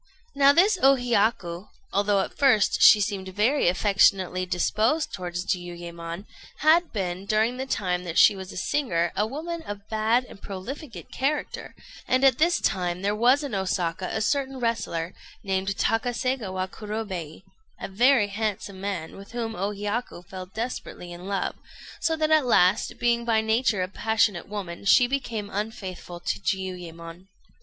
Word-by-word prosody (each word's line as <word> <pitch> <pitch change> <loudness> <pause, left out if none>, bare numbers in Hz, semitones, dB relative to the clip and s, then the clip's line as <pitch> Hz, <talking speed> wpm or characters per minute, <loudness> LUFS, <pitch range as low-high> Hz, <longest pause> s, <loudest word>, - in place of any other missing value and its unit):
] - - -36
Now 280 - +9
this 370 +6 +4
O 275 0 +6
Hiyaku, 215 -7 0 0.3
although 200 0 +2
at - - -5
first 255 -7 +3
she 215 - +9
seemed 195 -2 -2
very 215 +8 +2
affectionately 185 -1 +2
disposed 215 - +1
towards 180 -1 -4
Jiuyémon, 175 -1 -5 0.4
had 330 +3 +4
been, 190 -2 -3
during 220 +4 +1
the 265 +1 -4
time 180 -7 -1
that 170 -1 -4
she 205 - +7
was 190 -1 -8
a - - -9
singer, 175 -7 0
a 210 +2 +1
woman 325 +7 -5
of 205 -7 -8
bad 225 +3 +1
and 200 - -14
profligate 205 - -8
character; 290 +3 -2 0.3
and 255 +1 +2
at 265 -1 +4
this 340 +3 +3
time 180 0 -1
there 205 +1 +1
was 250 +6 +4
in 280 -6 -5
Osaka 185 -2 -1
a 220 - -2
certain 270 +2 -1
wrestler, 190 -8 -2 0.3
named 195 0 -1
Takaségawa 225 -5 -1
Kurobei, 195 -7 -6 0.4
a - - -5
very 230 +2 +3
handsome 200 -2 -3
man, 190 -5 -4
with 200 +3 -12
whom 230 -2 -3
O 195 +3 -1
Hiyaku 205 -2 -4
fell 185 0 -8
desperately 220 -4 -6
in 175 +2 -9
love; 200 -1 -1 0.5
so 325 - +1
that 315 0 0
at 310 -4 +4
last, 190 -3 +3
being 235 0 +1
by 230 -2 +2
nature 220 -3 +1
a - - -2
passionate 210 -2 0
woman, 195 -4 -6
she 245 +5 +6
became 235 -5 -3
unfaithful 190 -4 -5
to - - -2
Jiuyémon. 180 -2 -5
205 Hz, 160 wpm, -25 LUFS, 185-240 Hz, 0.5 s, Now